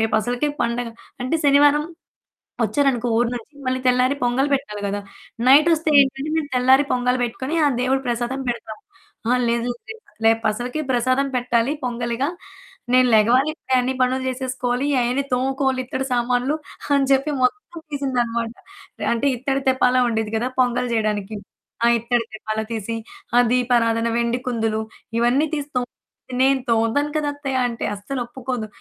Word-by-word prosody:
రేపు 220 0 +1
అసలుకే 245 +6 -1
పండగ." 235 0 -1 0.4
అంటే 255 +6 +1
శనివారం 290 +1 +5 0.8
వచ్చారనుకో 245 +1 +1
ఊరు 240 - +2
నుంచి 240 +5 -10 0.2
మళ్ళీ 255 0 0
తెల్లారి 250 +2 +3
పొంగల్ 255 +4 +1
పెట్టాలి 235 -7 -4
కదా! 205 +1 -2 0.5
నైటోస్తే 310 +3 +5
ఏంటంటే 270 +2 -3
నేను 305 -3 -1
తెల్లారి 260 +3 +5
పొంగల్ 250 0 +1
పెట్టుకొని, 260 +5 -4
ఆ - - +5 0.2
దేవుడు 265 +1 +1
ప్రసాదం 240 +3 -2
పెడతాం. 220 -2 -6 0.5
"అహా! 250 +2 +3
లేదు 235 +1 0 0.2
రెప 445 0 -9 0.2
రేపసలకే 225 +5 +1
ప్రసాదం 255 +2 +2
పెట్టాలి, 245 +1 +1
పొంగలిగా 240 +1 -2 0.6
నేను 255 0 +6
లెగవాలి 240 +7 +4
ఇప్పుడే 265 -4 -3
అన్ని 255 +1 -1
పనులు 255 +1 +2
చేసేసుకోవాలి. 255 0 -2
అయన్నీ 245 +3 +1
తోముకోవాలి 265 +1 0
ఇత్తడి 265 +1 -3
సామాన్లు" 245 +3 +1 0.4
అని 280 -1 +3
చెప్పి 275 +2 +3
మొత్తం 340 +5 -1
తీసింది 275 -3 -2
అన్నమాట. 230 0 -3 0.5
ఎ - - -1
అంటే 235 +4 0
ఇత్తడి 270 +2 -1
తెప్పాలం 255 -1 +3
ఉండేది 220 -2 -2
గదా! 240 +3 0
పొంగల్ 245 0 +1
చేయడానికి, 215 -2 -1 0.5
ఆ - - +6
ఇత్తడి 235 +1 0
తెప్పాల 215 0 -3
తీసి 225 0 -3 0.4
ఆ - - +7
దీపారాధన, 235 -2 +2
వెండి 235 +1 0
కుందులు 225 -3 0 0.4
ఇవన్నీ 245 +6 +3
తీసి 290 -2 -4
తోము 245 0 +1 0.6
"నేను 270 0 +3
తోముతాను 230 +6 +1
కదా! 300 -1 -1
అత్తయ్య" 270 -3 -2
అంటే 230 -1 -5
అస్సలు 205 +6 -5
ఒప్పుకోదు. 245 -2 -4
250 Hz, 150 wpm, -22 LUFS, 235-270 Hz, 0.8 s, ఆ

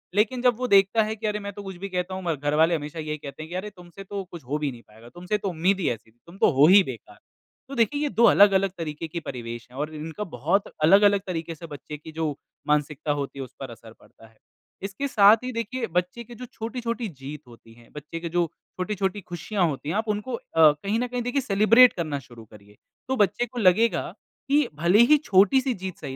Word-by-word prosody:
लेकिन 220 +4 +1
जब 250 -1 +3
वो 250 - -2
देखता 200 +1 +4
है 215 +1 -3
कि 220 +1 -7
अरे 210 0 -1
मैं 200 -1 -6
तो 205 +1 -9
कुछ 190 -1 -7
भी 195 +2 -6
कहता 180 0 -3
हूँ 190 0 -5
म 165 - +2
घर 145 +1 -2
वाले 165 +2 +4
हमेशा 150 +1 -6
यही 155 -1 -4
कहते 145 0 -9
हैं 160 - -11
कि 175 - -6
अरे 190 +3 -4
तुमसे 180 0 -13
तो 195 0 -5
कुछ 170 -4 -9
हो 140 +4 -2
भी 145 -2 -1
नहीं 120 -2 -12
पाएगा, 110 +2 -16
तुमसे 180 +7 -3
तो 205 -1 -3
उम्मीद 185 +3 +1
ही 180 - +1
ऐसी 115 -1 -6
थी, 115 - -38
तुम 170 +3 -13
तो - - +4
हो 140 0 +5
ही 195 +3 +8
बेकार। 130 -8 -9 0.5
तो 275 - -6
देखिए 235 +5 +1
ये 295 - 0
2 235 - +1
अलग-अलग 195 -3 +5
तरीके 165 -1 -5
के 170 +2 -5
परिवेश 120 -5 -7
हैं 130 - -13
और 150 +2 -3
इन 155 0 -6
इनका 165 +6 -5
बहुत 170 - 0 0.2
अलग-अलग 200 +4 +5
तरीके 165 -2 -4
से 165 +2 -10
बच्चे 150 0 -8
की 155 +2 -12
जो 155 -2 -2 0.3
मानसिकता 150 0 0
होती 140 -1 -4
है - - -3
उस 125 - -18
पर 135 - -6
असर 115 -1 -13
पड़ता 115 - -19
है। 110 0 -26 0.5
इसके 195 +8 -3
साथ 215 -4 +6
ही 255 - -3
देखिए 230 +1 -3
बच्चे 180 +7 -1
के 235 +1 -12
जो 250 - -8
छोटी-छोटी 230 0 -4
जीत 145 -3 -9
होती 115 -1 -16
है, 120 0 -20
बच्चे 150 +3 -7
के 170 0 -5
जो 175 +1 +1 0.3
छोटी-छोटी 195 +1 -2
खुशियाँ 180 +2 -2
होती 145 -1 -4
है 165 - -1
आप 220 +1 -1
उनको 210 +4 -2
अ, - - -8 0.2
कहीं 160 +8 +4
न 250 - -1
कहीं 245 0 -3
देखिए 245 +3 -1
सेलिब्रेट 230 +3 +6
करना 155 -5 -3
शुरू 120 -3 -14
करिए। 105 -1 -18 0.3
तो 265 - 0
बच्चे 205 +3 +2
को 245 +1 -7
लगेगा, 220 +3 +2 0.4
कि 290 -1 +3
भले 170 +7 +3
ही 305 - +8
छोटी-सी 205 +7 +4
जीत 190 -3 -7
सही 130 - -6
180 Hz, 245 wpm, -25 LUFS, 150-210 Hz, 0.5 s, ही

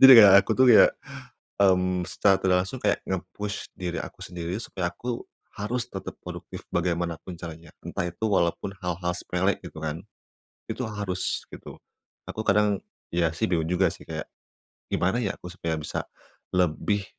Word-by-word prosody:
Jadi 135 0 +12
kayak, 100 -4 +10
aku - - -1
tuh, 130 - +6
ya, - - +9 0.8
mmm, 90 -1 +3
secara 95 +2 +3
tidak 90 -1 +4
langsung 130 +6 -6
kayak, 100 - +3
nge-push 95 +2 -4
diri 90 -2 -2
aku - - -10
sendiri 90 +3 -4
supaya 90 -6 -3
aku 120 +2 -4 0.3
harus 115 +4 -1
tetap - - -6
produktif - - -8
bagaimanapun 85 0 -1
caranya, 85 -1 -9
entah 90 - -2
itu 85 +5 -8
walaupun 95 -1 +1
hal-hal 90 0 -2
sepele, 95 +3 0
gitu 85 -3 -8
kan. 80 +1 -2 0.7
Itu 125 - -3
harus, 100 -3 -2
gitu. - - -9 0.5
Aku - - -5
kadang, 105 -1 +3 0.3
ya, 85 -1 +3
sih 80 - -2
bingung 80 -3 +1
juga 90 +1 +3
sih, - - -12
kayak - - -4 0.6
gimana 95 +7 +1
ya, 100 -4 -1
supaya 85 -2 -3
aku 75 - -6
bisa, - - -2 0.6
lebih 90 +4 +1
90 Hz, 155 wpm, -26 LUFS, 85-100 Hz, 0.8 s, Jadi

